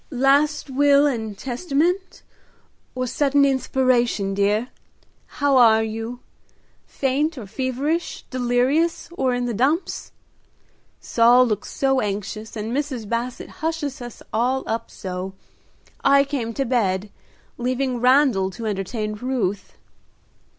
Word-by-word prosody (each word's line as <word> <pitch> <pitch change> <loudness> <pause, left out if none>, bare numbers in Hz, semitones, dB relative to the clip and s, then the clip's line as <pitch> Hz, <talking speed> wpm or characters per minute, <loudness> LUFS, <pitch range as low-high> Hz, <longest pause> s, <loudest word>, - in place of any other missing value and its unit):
"Last 280 +2 +2
will 285 +1 +4
and 220 -7 -2
testament, 340 - -1 0.7
or 255 0 -1
sudden 280 +2 +2
inspiration, 255 -6 +1
dear? 205 +5 +1 0.7
How 285 -2 +3
are 220 -3 +6
you? 225 +3 -5 0.7
faint 285 +4 -1
or 235 - -6
feverish, 265 - -2
delirious 255 +6 +1
or 265 -7 0
in 245 0 -1
the 240 - -2
dumps! 275 - 0 0.9
Saul 245 +2 +5
looks 215 -4 -2
so 270 -1 +1
anxious, 210 +2 -4
and 220 +3 -3
Mrs. 270 -7 -3
Basset 235 +3 -3
hushes 310 -4 -2
us 240 -1 -9
all 250 +4 +1
up 225 +1 -3
so, 185 0 -6 0.7
I 275 0 +6
came 270 -5 -3
to 275 - 0
bed, 205 -5 0 0.5
leaving 255 0 -1
Randal 250 -7 +4
to 230 - -5
entertain 210 +1 -3
Ruth." 210 -4 -2
250 Hz, 115 wpm, -22 LUFS, 220-275 Hz, 0.9 s, are